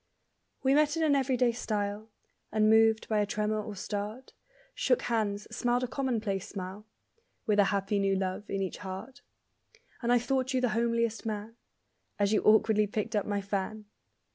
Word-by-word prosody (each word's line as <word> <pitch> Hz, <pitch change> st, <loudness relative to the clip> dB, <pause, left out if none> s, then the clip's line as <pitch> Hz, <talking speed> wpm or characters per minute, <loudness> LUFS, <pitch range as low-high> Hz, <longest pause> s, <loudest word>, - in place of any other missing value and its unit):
We 265 Hz, 0 st, +4 dB
met 300 Hz, +2 st, +3 dB
in 325 Hz, -, +1 dB
an 295 Hz, -2 st, +4 dB
everyday 255 Hz, -3 st, +2 dB
style; 210 Hz, -2 st, -3 dB, 0.4 s
Unmoved 220 Hz, +1 st, +4 dB
by 215 Hz, -1 st, +1 dB
a 205 Hz, -, +2 dB
tremor 215 Hz, +1 st, -1 dB
or 210 Hz, 0 st, -7 dB
start; 210 Hz, +6 st, -5 dB, 0.4 s
Shook -, -, +1 dB
hands, 210 Hz, -3 st, -1 dB
smiled 245 Hz, +1 st, +1 dB
a -, -, 0 dB
commonplace 225 Hz, -8 st, -2 dB
smile; 195 Hz, +2 st, -7 dB, 0.6 s
(With 210 Hz, -1 st, +2 dB
a 200 Hz, -, +6 dB
happy 200 Hz, 0 st, 0 dB
new 195 Hz, -1 st, +2 dB
love 190 Hz, +2 st, -3 dB
in 195 Hz, 0 st, -1 dB
each 190 Hz, -, -4 dB
heart), 200 Hz, +9 st, -7 dB, 0.8 s
And 240 Hz, -1 st, +1 dB
I 245 Hz, -, +6 dB
thought 260 Hz, +2 st, 0 dB
you -, -, +3 dB
the 250 Hz, -1 st, +1 dB
homeliest 230 Hz, 0 st, 0 dB
man 215 Hz, +1 st, -4 dB, 0.6 s
As 205 Hz, +1 st, +2 dB
you 215 Hz, -, +3 dB
awkwardly 215 Hz, 0 st, +4 dB
picked 215 Hz, +2 st, -3 dB
up 205 Hz, -, 0 dB
my 205 Hz, -1 st, -1 dB
fan! 200 Hz, +2 st, -3 dB
215 Hz, 165 wpm, -30 LUFS, 205-240 Hz, 0.8 s, a